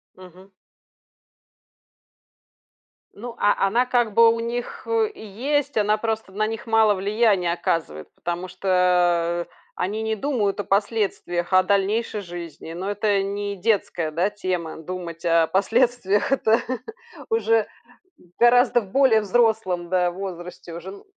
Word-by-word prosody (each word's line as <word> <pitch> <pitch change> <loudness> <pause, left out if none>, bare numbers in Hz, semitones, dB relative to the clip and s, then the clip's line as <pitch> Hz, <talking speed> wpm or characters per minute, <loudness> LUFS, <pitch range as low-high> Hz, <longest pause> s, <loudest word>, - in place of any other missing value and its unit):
Мгм. 185 +1 -15 2.6
Ну, 235 +2 -8
а 205 -1 +2
она, 235 +6 +2
как 240 -4 +1
бы, 230 +2 +7
у 230 - -4
них, 235 +1 -5
э, 450 -1 +1
есть. 275 - -2
Она 210 0 +2
просто 220 -2 -3
на 215 +3 -1
них 225 +1 -6
мало 220 -2 +4
влияния 200 -3 +1
оказывает, 165 - -3
потому 175 +1 -4
что 180 -2 +1 0.3
они 205 +4 -2
не 220 0 -1
думают 215 -5 -1
о - - -1
последствиях, 195 -4 -1
о 185 0 +6
дальнейшей 205 +3 0
жизни. 170 -3 -8
Но 185 +4 -4
это 205 -1 +1
не 200 +1 -3
детская, 185 -5 -1
да, 175 +6 +1
тема- 185 -5 -4
думать 170 -1 -7
о 165 -1 +3
последствиях. 225 +2 +1
Это 225 -4 +3 0.7
уже 225 -1 +2 0.5
в 175 -6 -26
гораздо 240 +1 +5
более 225 +2 +3
взрослом, 210 -5 +1
да, 180 -1 +2
возрасте 180 -2 -8
уже 170 +3 -8
н 200 - -11
200 Hz, 130 wpm, -23 LUFS, 180-225 Hz, 2.6 s, бы